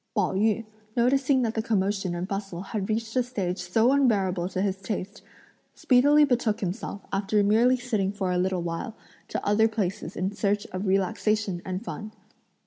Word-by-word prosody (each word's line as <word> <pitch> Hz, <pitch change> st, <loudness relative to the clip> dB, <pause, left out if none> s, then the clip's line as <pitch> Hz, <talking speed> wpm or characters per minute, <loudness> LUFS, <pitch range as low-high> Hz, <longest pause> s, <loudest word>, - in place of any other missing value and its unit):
Pao -, -, +1 dB
yü, 215 Hz, +3 st, +1 dB, 0.3 s
noticing 260 Hz, +2 st, +3 dB
that 225 Hz, -1 st, 0 dB
the 220 Hz, -, -1 dB
commotion 195 Hz, -4 st, 0 dB
and 175 Hz, +2 st, -3 dB
bustle 195 Hz, -3 st, -4 dB
had 200 Hz, -1 st, -4 dB
reached 225 Hz, +1 st, -2 dB
a 255 Hz, -, +4 dB
stage 200 Hz, -7 st, -3 dB
so 220 Hz, +8 st, +2 dB
unbearable 195 Hz, -10 st, +2 dB
to 185 Hz, 0 st, -2 dB
his 195 Hz, -1 st, 0 dB
taste, 200 Hz, 0 st, -5 dB, 0.5 s
speedily 290 Hz, +4 st, +5 dB
betook 235 Hz, -5 st, 0 dB
himself, 200 Hz, +1 st, -4 dB
after 205 Hz, +1 st, +2 dB
merely 230 Hz, +5 st, +4 dB
sitting 215 Hz, -6 st, -1 dB
for 195 Hz, -3 st, -2 dB
a 180 Hz, -, +1 dB
little 185 Hz, -1 st, 0 dB
while, 170 Hz, +7 st, -4 dB, 0.3 s
to -, -, -4 dB
other 215 Hz, +2 st, +4 dB
places 205 Hz, -4 st, -3 dB
in 185 Hz, +2 st, -1 dB
search 205 Hz, 0 st, 0 dB
of 185 Hz, +2 st, -3 dB
relaxation 195 Hz, -1 st, 0 dB
and 185 Hz, +4 st, -5 dB
fun. 215 Hz, -1 st, -6 dB
205 Hz, 170 wpm, -26 LUFS, 190-225 Hz, 0.5 s, speedily